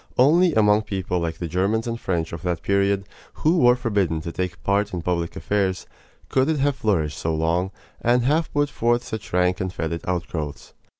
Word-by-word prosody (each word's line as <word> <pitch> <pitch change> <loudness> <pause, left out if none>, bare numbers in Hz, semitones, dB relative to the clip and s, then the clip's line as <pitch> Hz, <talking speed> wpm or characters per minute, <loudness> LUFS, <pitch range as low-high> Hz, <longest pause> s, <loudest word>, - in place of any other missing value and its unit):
Only 165 +6 +5
among 105 -1 +4
people 95 -4 -2
like 80 -1 -3
the 85 - -4
Germans 100 +7 0
and 115 -1 -3
French 85 -6 -2
of 85 - -5
that 90 -3 -2
period, 100 0 +1 0.3
who 165 +3 +2
were 125 -3 +6
forbidden 100 -10 0
to 85 - -5
take 90 -5 -4
part 100 0 +1
in 85 - -4
public 85 -2 -1
affairs, 95 -3 -1 0.4
could 130 +2 +2
it 160 - +1
have 140 0 +1
flourished 85 - 0
so 80 -1 -1
long, 85 +4 0 0.3
and 120 +1 +3
have 155 +5 +1
put 145 0 +1
forth 120 +1 +1
such 110 -3 -7
rank 90 +1 +2
and 95 -1 -2
fetid 85 -1 -3
outgrowths. 80 -6 -4
95 Hz, 190 wpm, -23 LUFS, 85-120 Hz, 0.4 s, were